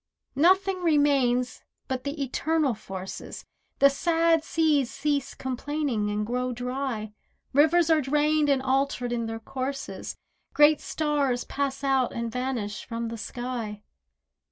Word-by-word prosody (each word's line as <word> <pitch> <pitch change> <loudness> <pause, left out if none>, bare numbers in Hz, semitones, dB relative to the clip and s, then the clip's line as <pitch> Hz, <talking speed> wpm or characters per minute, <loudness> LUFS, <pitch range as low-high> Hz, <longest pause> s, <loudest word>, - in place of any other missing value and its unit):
Nothing 375 +5 +3
remains 275 -6 +2 0.3
but 260 0 -3
the 285 0 -2
Eternal 300 +1 0
Forces, 190 -3 -8 0.3
The 280 0 +6
sad 330 +2 +2
seas 310 -6 +2
cease 285 -2 -1
complaining 260 -4 -2
and 210 0 -1
grow 250 +2 -1
dry, 245 -3 -3 0.4
Rivers 320 +4 +4
are 315 -1 +4
drained 295 +2 +2
and 270 -2 +2
altered 265 -2 0
in 235 -1 -1
their 225 0 -4
courses, 270 +3 -5 0.4
Great 295 0 +6
stars 285 -5 0
pass 275 -1 -3
out 270 -2 +2
and 235 -1 -3
vanish 245 -5 -3
from 230 -1 -4
the 230 - -5
sky. 235 -4 -5
270 Hz, 130 wpm, -26 LUFS, 245-295 Hz, 0.4 s, The